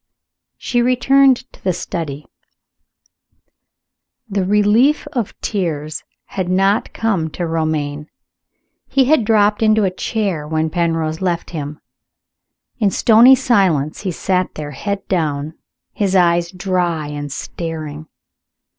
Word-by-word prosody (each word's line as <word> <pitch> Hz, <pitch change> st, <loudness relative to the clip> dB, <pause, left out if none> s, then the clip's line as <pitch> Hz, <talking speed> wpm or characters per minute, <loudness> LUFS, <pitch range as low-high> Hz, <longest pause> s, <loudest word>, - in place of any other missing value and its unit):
She 240 Hz, -1 st, 0 dB
returned 260 Hz, +2 st, +4 dB, 0.2 s
to -, -, -19 dB
the 185 Hz, -, +1 dB
study. 155 Hz, -5 st, -5 dB, 2.0 s
The 200 Hz, -2 st, -1 dB
relief 210 Hz, +10 st, +3 dB
of 240 Hz, -7 st, -3 dB
tears 155 Hz, -7 st, -3 dB, 0.2 s
had 185 Hz, -2 st, -4 dB
not 195 Hz, +3 st, +2 dB
come 195 Hz, -8 st, -1 dB
to 175 Hz, +3 st, -4 dB
Romayne. 155 Hz, -2 st, -2 dB, 0.8 s
He 270 Hz, -1 st, +2 dB
had 275 Hz, -2 st, +3 dB
dropped 210 Hz, -1 st, +2 dB
into 215 Hz, -1 st, +3 dB
a 190 Hz, -, +1 dB
chair 185 Hz, -7 st, -2 dB
when 160 Hz, 0 st, -1 dB
Penrose 165 Hz, -2 st, -1 dB
left 175 Hz, -2 st, -2 dB
him. 150 Hz, -2 st, -6 dB, 1.0 s
In 210 Hz, -3 st, +3 dB
stony 235 Hz, +6 st, +6 dB
silence 190 Hz, -, +1 dB
he 195 Hz, -, -3 dB
sat 185 Hz, +1 st, -1 dB
there, 150 Hz, -1 st, -6 dB
his 130 Hz, -, -11 dB
head 200 Hz, -1 st, -2 dB
down, 155 Hz, -4 st, -1 dB, 0.4 s
his 195 Hz, -2 st, 0 dB
eyes 170 Hz, -1 st, +3 dB
dry 180 Hz, -4 st, -1 dB
and 145 Hz, -1 st, -6 dB
staring. 155 Hz, 0 st, -6 dB
180 Hz, 120 wpm, -18 LUFS, 155-210 Hz, 2.0 s, stony